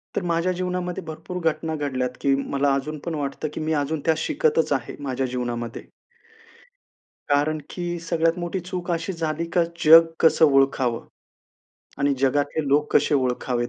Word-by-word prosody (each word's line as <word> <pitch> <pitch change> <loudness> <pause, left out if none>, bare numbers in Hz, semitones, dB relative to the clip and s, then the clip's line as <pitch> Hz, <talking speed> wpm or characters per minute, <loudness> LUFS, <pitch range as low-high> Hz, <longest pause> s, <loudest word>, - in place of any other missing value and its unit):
तर - - 0
माझ्या 170 +1 0
जीवनामध्ये 180 0 -3
भरपूर 160 +3 -6
घटना 160 +1 -5
घडल्यात, 130 -4 -2
की 140 - +3
मला 140 0 0
अजून 145 +3 -2
पण 170 -2 -2
वाटतं, 145 +1 -3
की - - -5
मी 155 0 -1
अजून 145 +1 -1
त्या 160 - +4
शिकतच 155 -1 +1
आहे, 130 -4 -3
माझ्या 135 -1 -1
जीवनामध्ये. 120 -1 -4 1.5
कारण 145 +2 +2
की 175 -1 -4
सगळ्यात 165 +1 0
मोठी 175 +2 -3
चूक 180 0 -5
अशी 170 +2 -1
झाली, 165 -1 -2
का 175 -1 +3 0.2
जग 165 +1 +9
कसं 160 0 +5
ओळखावं? 135 -4 +2 0.9
आणि 140 0 +2
जगातले 145 +3 0
लोक 145 +2 +2
कसे - - +2
ओळखावेत? 125 -2 0
155 Hz, 155 wpm, -23 LUFS, 135-170 Hz, 1.5 s, जग